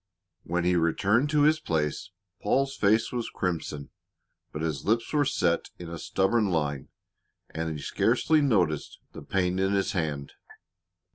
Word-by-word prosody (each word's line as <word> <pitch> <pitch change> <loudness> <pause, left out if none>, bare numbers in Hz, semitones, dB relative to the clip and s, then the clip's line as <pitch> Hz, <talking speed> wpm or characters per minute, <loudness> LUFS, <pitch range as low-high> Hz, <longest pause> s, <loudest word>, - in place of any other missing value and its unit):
When 85 +1 -2
he 90 +1 +2
returned 100 - +2
to 150 -1 +3
his 155 +1 +4
place 80 - -2 0.3
Paul's 135 +5 +1
face 110 +3 +2
was 120 -2 -3
crimson, 80 -5 -3 0.6
but 75 - -5
his 75 -5 -2
lips 115 +5 0
were 145 -1 +3
set 85 -11 0
in 85 -1 -8
a 85 - -6
stubborn 100 +5 +1
line 75 -5 -1 0.6
and 80 -1 -3
he 70 - -8
scarcely 155 -1 +2
noticed 90 - +1
the - - -9
pain 90 -1 0
in 95 +1 +1
his 100 -1 +1
hand. 75 -7 -3
90 Hz, 150 wpm, -27 LUFS, 80-115 Hz, 0.6 s, his